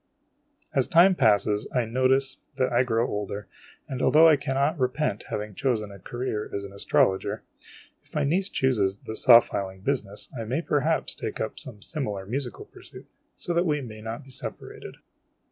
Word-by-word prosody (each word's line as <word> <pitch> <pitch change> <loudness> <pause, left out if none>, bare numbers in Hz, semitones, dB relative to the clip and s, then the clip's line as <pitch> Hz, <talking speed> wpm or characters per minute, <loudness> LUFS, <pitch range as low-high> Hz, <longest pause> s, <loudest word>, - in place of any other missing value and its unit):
j - - -51
<j - - -25
As 130 - +1
time 175 +4 +6
passes, 105 - +2
I 125 -2 +2
notice 130 +3 +1 0.2
that 130 -1 0
I 120 - +4
grow 120 -2 +1
older; 105 0 -4 0.4
and, 130 -1 -4
although 160 +2 +6
I 160 - +7
cannot 140 +3 0
repent 125 -3 -1
having 105 0 -4
chosen 110 -2 -1
the 100 -1 -11
career 115 +1 -4
of 100 - -5
an 100 0 -9
astrologer, 95 -1 +1 0.6
if - - -20
my - - +1
niece 185 +7 +1
chooses 105 - +1
the 110 - -5
saw 120 0 +8
filing 95 -4 -5
business, 105 -5 -3
I 115 -2 -4
may 130 +9 -2
perhaps 150 +2 0
take 110 - -5
up 110 - -3
some 120 -8 -8
similar 105 - -4
musical 125 +4 -4
pursuit, - - -14 0.3
so 175 - -3
that 170 +1 +2
we 150 -1 +1
may 110 -5 -8
not 115 +5 -6
be 135 - -16
separated. - - -7
125 Hz, 180 wpm, -26 LUFS, 105-140 Hz, 0.6 s, saw